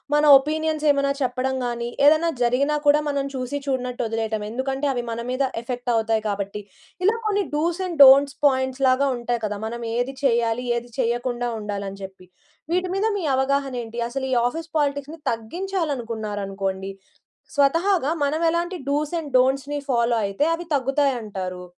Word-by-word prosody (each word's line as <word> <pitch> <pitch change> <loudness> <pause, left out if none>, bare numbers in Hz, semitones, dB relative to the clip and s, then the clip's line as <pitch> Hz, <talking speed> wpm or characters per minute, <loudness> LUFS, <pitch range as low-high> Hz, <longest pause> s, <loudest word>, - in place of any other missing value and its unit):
మన 295 - +3 0.2
ఒపీనియన్సేమన్నా 300 -1 +1
చెప్పడం 260 +1 -1
గానీ, 235 0 -3 0.2
ఏదన్నా 315 +2 +5
జరిగినా 275 +5 +2
కూడా, 290 +1 +5
మనం 280 -1 0
చూసి 260 +3 -3
చూడనట్టు 250 -3 -2
వదిలేయటం. 220 -1 -2
ఎందుకంటే, 265 +4 -2
అవి 245 - -2
మన 230 - -4
మీద 265 +2 0 0.2
ఎఫెక్టవుతాయి 230 -3 -1
కాబట్టి. 200 +1 -3 0.4
ఇలా 430 - +4
కొన్ని 410 -2 +1
డూస్ 335 +4 0
అండ్ 335 -5 -6
డోంట్స్ 275 +1 +7
పాయింట్స్‌లాగా 260 0 +2
ఉంటాయి 240 0 -2
కదా! 205 -1 -3
మనమేది 235 +3 -3
చెయ్యాలి, 235 -1 +1
ఏది 240 0 -5
చేయకుండా 240 0 -1
ఉండాలని 200 -1 -5
జెప్పి. 190 -1 -11 0.5
వీటి 365 0 0
మీద 405 +3 0
మీ 360 - -3
అవగాహనేంటి? 265 -4 -1
అసలు 265 +1 -3
ఈ - - +2
ఆఫీస్ 325 +4 -6
పాలిటిక్స్‌ని 285 +2 -2
తగ్గించాలనుకున్నారనుకోండి! 220 - -3 0.6
స్వతహాగా 325 +2 +2
మనమెలాంటి 335 +4 0
డూస్ 295 +2 0
అండ్ 295 -4 -7
డోంట్స్‌ని 270 +3 +1
ఫాలో 235 -2 +2
అయితే, 200 +8 -1
అవి 345 - -8
తగ్గుతాయంటారూ? 235 -10 -1
260 Hz, 135 wpm, -23 LUFS, 230-290 Hz, 0.6 s, డోంట్స్